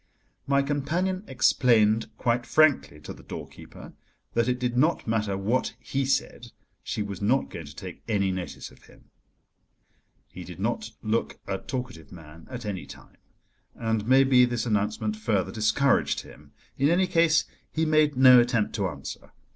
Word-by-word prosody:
My 140 0 +3
companion 165 +7 -1
explained 115 -3 +3
quite 120 -1 0
frankly 145 - +3
to 75 - -8
the - - -15
doorkeeper - - -10 0.4
that 115 0 +1
it 125 - 0
did 125 -1 -2
not 155 +7 +2
matter 105 -3 0
what 110 +7 -1
he 135 0 -2
said, 120 -2 -1 0.3
she 105 +4 -3
was 100 -2 -7
not 125 +7 +1
going 80 -3 -8
to 70 - -12
take - - -9
any 100 -3 +1
notice 95 -1 -6
of - - -20
him. - - -21 1.2
He - - -10
did - - -10
not - - -2
look 110 +2 -1
a 95 -1 -3
talkative 125 - -6
man 80 -1 -13
at 125 -3 -7
any 100 -3 -5
time, - - -14 0.6
and, 110 -2 -2
maybe, 130 -1 +5
this 120 -2 0
announcement 105 0 -1
further 105 -3 -1
discouraged 115 +5 +1
him. - - -16 0.3
In 140 +2 +3
any 180 +3 +3
case, 165 -3 +3 0.3
he 160 0 0
made 155 -3 +2
no 130 -1 +8
attempt 120 -3 +1
to - - 0
answer. - - -9
120 Hz, 160 wpm, -26 LUFS, 105-135 Hz, 1.2 s, no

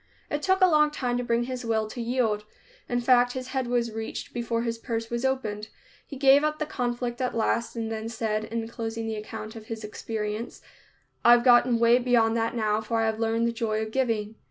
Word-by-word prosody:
It 295 - -1
took 380 +2 +2
a - - +9
long 300 -3 +4
time 250 -4 -2
to - - -2
bring 235 0 +1
his 255 0 -5
will 220 -2 0
to 240 - -5
yield. 230 -3 0 0.5
In 245 - +1
fact, 245 0 +4
his 255 0 -5
head 260 -2 -2
was 240 -1 0
reached 220 0 -6
before 235 -1 -1
his 230 -1 -3
purse 230 0 -4
was 235 +1 -2
opened. 220 -6 -1 0.4
He 280 - -8
gave 275 +1 +6
up 305 0 0
the 305 - -2
conflict 245 -3 -3
at 250 -2 -1
last 230 +1 0
and 225 -1 -3
then 220 0 -4
said, 220 -2 -2
in 225 0 -4
closing 225 0 -4
the 225 - -2
account 215 +1 -7
of 220 -1 -10
his 225 -1 -6
experience, 210 +1 -5 0.6
"I've 240 0 +7
gotten 240 -1 +5
way 235 +1 +5
beyond 235 -2 +3
that 230 +1 -1
now, 215 -1 +1
for 225 +1 -1
I 225 - +2
have 220 0 -1
learned 225 0 +1
the - - 0
joy 225 -2 -1
of 220 - -6
giving." 225 -4 -1
230 Hz, 220 wpm, -26 LUFS, 225-245 Hz, 0.6 s, a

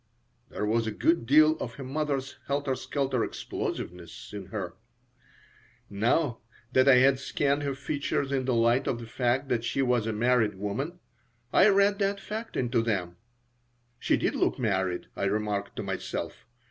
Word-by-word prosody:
There 105 - -3
was 115 +1 +1
a - - -1
good 140 +3 +1
deal 155 +3 +6
of 115 - -5
her 140 - -7
mother's 140 0 -2
helter 140 -1 0
skelter 130 -1 -1
explosiveness 90 +3 -5
in 100 -3 -6
her 95 -4 -5 1.2
Now, 120 +5 +1 0.3
that 130 +1 +4
I 135 - +8
had 130 +1 +5
scanned 140 +1 0
her 140 -2 -2
features 140 0 -2
in 135 -2 0
the 125 -2 +1
light 115 +2 +3
of 120 - -1
the 115 - -7
fact 125 +3 0
that 115 -2 0
she 135 +3 0
was 125 -3 +1
a - - 0
married 110 -1 +2
woman, 105 - -3 0.6
I 195 - +7
read 200 +1 +3
that 200 0 0
fact 220 +3 -6
into 120 -2 +1
them. 95 -6 -2 0.8
She - - +2
did - - 0
look - - +1
married, 95 -6 0
I - - -1
remarked 100 0 -1
to - - -4
myself. - - -5
125 Hz, 165 wpm, -28 LUFS, 110-140 Hz, 1.2 s, I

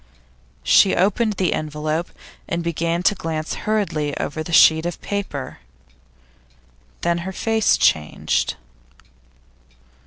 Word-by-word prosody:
She 190 - +5
opened 210 +4 +1
the 185 -3 0
envelope, 155 +2 -3 0.4
and 170 0 -2
began 170 +1 -1
to 210 - +4
glance 160 -4 -4 0.2
hurriedly 155 -9 -1
over 155 +2 -3
the 155 - -6
sheet 160 -1 +6
of 175 - -5
paper. 195 -10 -5 1.4
Then 170 0 0
her 190 +2 -5
face 225 +2 +1
changed. 75 -1 +1
170 Hz, 105 wpm, -21 LUFS, 155-190 Hz, 1.4 s, sheet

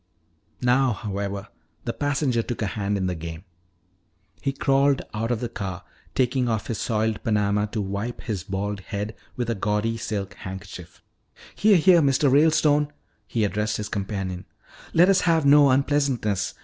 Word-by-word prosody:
Now, 125 0 +3
however, 100 -1 -4 0.4
the - - -2
passenger 140 -4 0
took 115 0 -4
a 100 - -2
hand 100 -1 -1
in 95 - -1
the 90 - 0
game. 80 0 -7 1.0
He 135 - 0
crawled 135 0 +2
out 110 +2 -2
of 120 -2 -1
the 120 - -1
car, 95 -5 -5 0.3
taking 125 -1 +1
off 110 -3 -1
his 115 - -3
soiled 110 -1 -1
panama 105 -2 +1
to 105 0 -3
wipe 100 +5 -4
his 100 -6 -4
bald 100 +2 -3
head 105 +2 -5 0.2
with 120 -2 -2
a 115 - +1
gaudy 105 +2 -1
silk 105 -3 -4
handkerchief. 95 -3 -9 0.5
"Here, 210 -2 +4
here, 175 0 +6
Mr. 140 -1 +3
Ralestone," 150 0 +4 0.4
he 115 - 0
addressed 105 +1 0
his 105 0 -4
companion, 95 -2 -4 0.5
"let 175 +2 +5
us 195 -1 +4
have 165 -3 +2
no 145 0 +7
unpleasantness. 130 -7 +1
110 Hz, 160 wpm, -24 LUFS, 100-135 Hz, 1.0 s, no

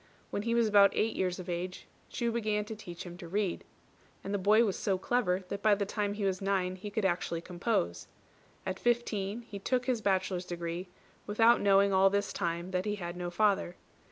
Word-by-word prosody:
When - - -1
he 230 +2 0
was 235 -1 +3
about 200 -1 +6
eight 225 +1 +1
years 180 -1 0
of 185 - -8
age, 180 +1 -4 0.2
Chu 235 -1 -1
began 215 -2 0
to 220 - -6
teach 175 -5 -8
him 175 -1 -9
to 175 - -9
read; 195 0 -1 0.6
and 195 - -4
the 205 - 0
boy 215 +4 +5
was 200 - -1
so 195 -2 0
clever 190 -3 0
that 200 0 -4
by 210 -1 +5
the 200 0 -1
time 205 0 -2
he 205 - -4
was 190 -1 0
nine 190 -2 0
he 190 +3 -7
could 205 0 -1
actually 175 -2 0
compose. 175 - -2 0.6
At 185 0 -3
fifteen 235 -2 0
he 210 -3 -8
took 250 +5 0
his 250 -4 0
bachelor's 185 -2 0
degree, 175 +1 -4 0.4
without 225 +3 +4
knowing 200 0 +4
all 190 +1 +6
this 200 0 -1
time 170 +2 -2
that 185 0 -1
he 210 0 -1
had 175 -3 -5
no 175 0 -4
father. 195 -2 +1
195 Hz, 210 wpm, -31 LUFS, 180-210 Hz, 0.6 s, about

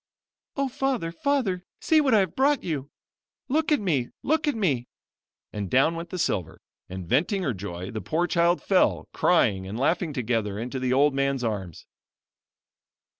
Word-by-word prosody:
"O 275 -1 0
Father! 260 -9 -1
Father! 195 -3 0 0.2
see 315 -1 +3
what 265 -6 +3
I 210 - +6
have 185 -4 -2
brought 280 +2 +2
you! 145 -5 -3 0.6
Look 310 +3 +1
at 300 - +4
me! 150 -11 0
Look 310 +2 +1
at 290 - +1
me" 140 - 0 0.7
and 100 -3 -4
down 135 - +3
went 165 +1 -6
the 185 - -5
silver, 90 - -2 0.3
and 95 -2 -7
venting 180 - +1
her 130 - 0
joy, 95 -1 -6
the 110 - -4
poor 170 +3 0
child 170 0 +2
fell; 190 -2 +2
crying 100 - +2
and 105 +4 -5
laughing 165 +4 +1
together, 115 -6 -1
into 125 +4 -4
the 130 0 -1
old 140 +2 +4
man's 140 -1 0
arms. 100 -7 -4
155 Hz, 170 wpm, -26 LUFS, -, 0.7 s, I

